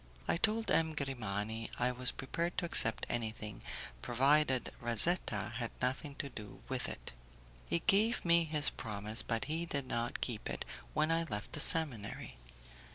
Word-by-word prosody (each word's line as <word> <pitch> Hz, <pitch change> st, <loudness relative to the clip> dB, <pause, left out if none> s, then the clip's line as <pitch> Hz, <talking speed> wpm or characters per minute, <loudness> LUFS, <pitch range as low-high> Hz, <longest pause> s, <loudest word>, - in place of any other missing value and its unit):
I -, -, +2 dB
told 220 Hz, +5 st, +1 dB
M. 160 Hz, -1 st, +2 dB
Grimani 110 Hz, -5 st, -3 dB
I 125 Hz, +1 st, +1 dB
was 125 Hz, 0 st, +2 dB
prepared 170 Hz, +6 st, -3 dB
to -, -, 0 dB
accept 110 Hz, -9 st, +3 dB
anything, 110 Hz, -3 st, -2 dB, 0.4 s
provided 135 Hz, -, +2 dB
Razetta 120 Hz, -, +2 dB
had 120 Hz, 0 st, -3 dB
nothing 135 Hz, +3 st, -2 dB
to 140 Hz, -, -4 dB
do 105 Hz, -5 st, -10 dB
with -, -, -2 dB
it. -, -, -6 dB, 0.6 s
He 170 Hz, -, 0 dB
gave 220 Hz, +3 st, +3 dB
me 170 Hz, -1 st, +4 dB
his 150 Hz, -2 st, +3 dB
promise, 110 Hz, 0 st, +4 dB
but 115 Hz, -2 st, -2 dB
he 165 Hz, +3 st, -2 dB
did 140 Hz, -4 st, -2 dB
not 120 Hz, -1 st, -2 dB
keep 115 Hz, -4 st, -3 dB
it -, -, -4 dB, 0.3 s
when 155 Hz, -, +2 dB
I 165 Hz, 0 st, +2 dB
left 105 Hz, -6 st, -5 dB
the -, -, -3 dB
seminary. 130 Hz, -, 0 dB
130 Hz, 160 wpm, -34 LUFS, 110-160 Hz, 0.6 s, me